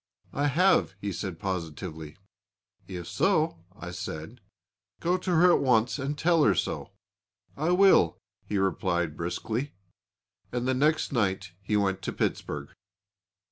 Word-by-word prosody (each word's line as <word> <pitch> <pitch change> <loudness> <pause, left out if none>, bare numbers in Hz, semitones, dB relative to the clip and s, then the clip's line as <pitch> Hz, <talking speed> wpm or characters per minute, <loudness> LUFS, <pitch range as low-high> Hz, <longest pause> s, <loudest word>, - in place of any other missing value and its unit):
'I 145 +1 +1
have,' 165 - +3
he 100 0 -3
said 90 -1 -4
positively. 80 -3 -5 0.7
'If 90 -3 -6
so,' 160 - +1 0.2
I 90 -3 -7
said, 90 +6 -7 0.6
'go 175 +2 +1
to 185 - -5
her 175 +2 +6
at - - +4
once 125 0 +2
and 140 +2 -3
tell 165 0 +3
her 100 -7 +4
so.' - - -2 0.7
'I 155 +4 -1
will,' 180 - +5 0.3
he 105 - -1
replied 85 -3 0
briskly 110 - -3 0.8
and 125 +1 -2
the 130 - +2
next 150 +4 +2
night 95 -5 0
he 105 +2 0
went 95 -2 0
to - - -4
Pittsburg." 75 -1 -2
105 Hz, 140 wpm, -28 LUFS, 90-145 Hz, 0.8 s, her